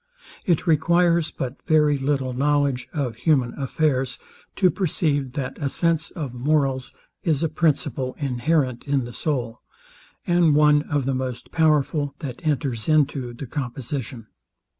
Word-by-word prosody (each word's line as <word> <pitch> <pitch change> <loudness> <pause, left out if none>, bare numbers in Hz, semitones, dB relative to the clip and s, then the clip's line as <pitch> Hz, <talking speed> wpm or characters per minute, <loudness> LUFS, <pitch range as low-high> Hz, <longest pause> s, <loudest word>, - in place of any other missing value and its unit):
It 170 -2 +2
requires 170 0 +3
but 130 -2 -6
very 150 -2 +4
little 135 -2 -1
knowledge 140 -2 +1
of 130 -7 -3
human 130 -2 +2
affairs 135 -2 0 0.4
to 185 -2 +4
perceive, 145 -7 0
that 135 -1 -4
a 140 - 0
sense 165 +1 0
of 150 -9 -6
morals 135 0 0 0.3
is 160 -3 0
a - - +3
principle 145 -5 0
inherent 135 -1 0
in 140 -3 +1
the 120 - -8
soul, 125 -6 -3 0.6
and 175 -4 +4
one 150 0 +5
of 145 -3 0
the 135 - 0
most 130 -2 -4
powerful 150 -2 +1
that 130 -1 -7
enters 135 -6 -1
into 140 -5 +2
the 140 - -7
composition. 125 -2 -5
145 Hz, 140 wpm, -23 LUFS, 130-155 Hz, 0.6 s, one